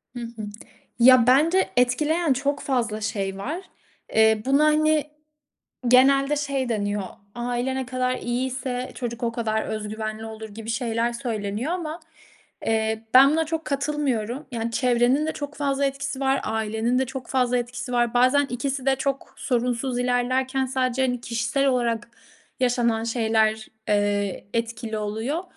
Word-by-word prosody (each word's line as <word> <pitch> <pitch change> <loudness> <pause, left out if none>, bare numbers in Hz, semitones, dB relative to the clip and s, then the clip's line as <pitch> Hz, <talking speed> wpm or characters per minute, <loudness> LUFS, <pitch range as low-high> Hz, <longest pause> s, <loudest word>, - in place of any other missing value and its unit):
Hı - - -4
hı. 230 -1 -7 0.6
ya, 250 0 +7
bence 315 +9 +4
etkileyen 300 +6 +2
çok 280 +2 -1
fazla 235 -5 -1
şey 195 -3 -2
var. 290 - -3 0.6
Eee, 220 -1 +4
buna, 280 +3 +4
hani, 305 -1 +3 0.8
genelde 275 +3 +5
şey 275 -3 -1
deniyor. 205 -2 -1 0.3
Aile 245 +2 -2
ne 265 -1 -2
kadar 255 0 -1
iyiyse 250 +1 -3
çocuk 240 -1 -5
o 230 - +1
kadar 220 -2 -1
öz 215 -1 -4
güvenli 215 0 -5
olur 220 0 -8
gibi 220 +2 -8
şeyler 230 0 0
söyleniyor 230 +1 -3
ama, 330 -2 -4 0.7
eee, 220 0 0
ben 270 +2 +8
buna 320 +1 +1
çok 320 0 -3
katılmıyorum. 275 -3 -1
Yani, 230 -1 -3
çevrenin 250 +4 +2
de 315 - 0
çok 290 0 -6
fazla 280 -1 0
etkisi 275 0 -3
var. 270 0 +2
Ailenin 220 +3 0
de 265 - +1
çok 265 0 -7
fazla 250 -2 +1
etkisi 250 +1 -4
var. 240 -1 +2
Bazen 255 +4 +4
ikisi 260 +2 -3
de 270 -1 +4
çok 275 +1 -3
sorunsuz 245 0 -1
ilerlerken 255 +2 +1
sadece, 255 0 0
hani, 245 -2 0
kişisel 235 +4 0
olarak 235 -3 0 0.5
yaşanan 240 -3 +1
şeyler, 220 -2 +1 0.2
eee, 205 -1 0
etkili 230 -1 -2
oluyor. 220 - -2
245 Hz, 145 wpm, -24 LUFS, 225-270 Hz, 0.8 s, ben